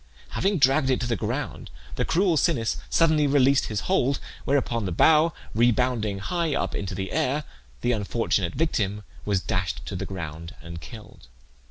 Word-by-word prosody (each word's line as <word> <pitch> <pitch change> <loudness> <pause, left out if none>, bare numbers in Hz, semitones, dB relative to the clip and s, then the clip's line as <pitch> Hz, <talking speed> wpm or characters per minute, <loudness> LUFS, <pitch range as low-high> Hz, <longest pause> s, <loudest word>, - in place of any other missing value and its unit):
Having 195 0 0
dragged 135 0 +4
it 130 - +2
to - - -1
the 120 -1 0
ground, 95 - -4 0.3
the - - 0
cruel 180 0 +2
Sinnis 140 -8 +1
suddenly 155 -3 +3
released 140 -1 +4
his 105 -1 -2
hold, 140 -8 +1 0.3
whereupon 120 -5 +1
the 95 - -2
bough 155 - +5 0.2
rebounding 120 -3 +2
high 165 - -1
up - - -1
into 95 -1 -3
the 95 +1 -4
air, 140 +4 0 0.4
the 120 - +1
unfortunate 105 -4 0
victim 105 -10 0 0.2
was 100 -3 +1
dashed 90 -2 -2
to - - -5
the - - -4
ground 85 -3 -7
and 85 -1 -9
killed. 105 - -12
120 Hz, 165 wpm, -25 LUFS, 100-145 Hz, 0.4 s, bough